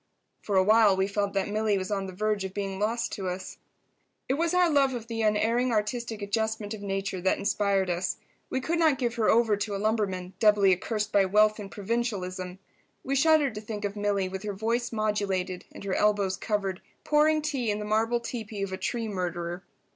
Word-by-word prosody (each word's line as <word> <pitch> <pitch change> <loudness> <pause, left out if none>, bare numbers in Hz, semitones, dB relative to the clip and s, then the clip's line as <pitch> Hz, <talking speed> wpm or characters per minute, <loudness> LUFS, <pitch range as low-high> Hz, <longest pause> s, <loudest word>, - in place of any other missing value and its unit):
For 205 - -2
a 190 - +5
while 215 -1 +5
we 190 - +2
felt 200 0 -1
that 195 0 0
Milly 210 -1 +1
was 185 +1 -4
on 195 -1 -1
the - - -6
verge 210 +1 -1
of 190 0 -6
being 195 -1 -3
lost 230 +3 -1
to 195 -3 -4
us. 185 +1 -6 0.7
It 260 - +1
was 330 +4 0
our 360 -1 +4
love 275 -4 +3
of 230 -2 -5
the 230 -1 -3
Unerring 225 +4 +2
Artistic 220 0 -2
Adjustment 220 0 -2
of 215 - -7
Nature 195 -2 -3
that 190 - +2
inspired 200 -1 +1
us. 180 +1 -1 0.3
We 260 - -1
could 335 +5 -1
not 315 -5 +4
give 240 -2 -1
her 230 -3 +1
over 225 -2 +4
to 205 0 -3
a - - -1
lumberman, 195 -4 -1
doubly 205 -3 +5
accursed 210 +3 -2
by 200 -1 +4
wealth 215 +3 +3
and 200 -2 -7
provincialism. 195 -4 -3 0.5
We 275 - -1
shuddered 295 -2 +4
to 210 - -6
think 210 -1 -5
of 200 0 -3
Milly, 205 -2 0
with 190 0 -5
her 210 0 -4
voice 230 +4 -1
modulated 200 -4 -1
and - - -10
her 195 -1 -2
elbows 205 -2 +2
covered, 195 -4 -2 0.2
pouring 305 +1 +3
tea 275 -7 -1
in 205 - 0
the 210 - -5
marble 225 +3 +1
teepee 220 -4 -5
of 195 -1 -4
a - - -2
tree 225 +4 -2
murderer. 175 -3 -3
210 Hz, 205 wpm, -27 LUFS, 195-230 Hz, 0.7 s, a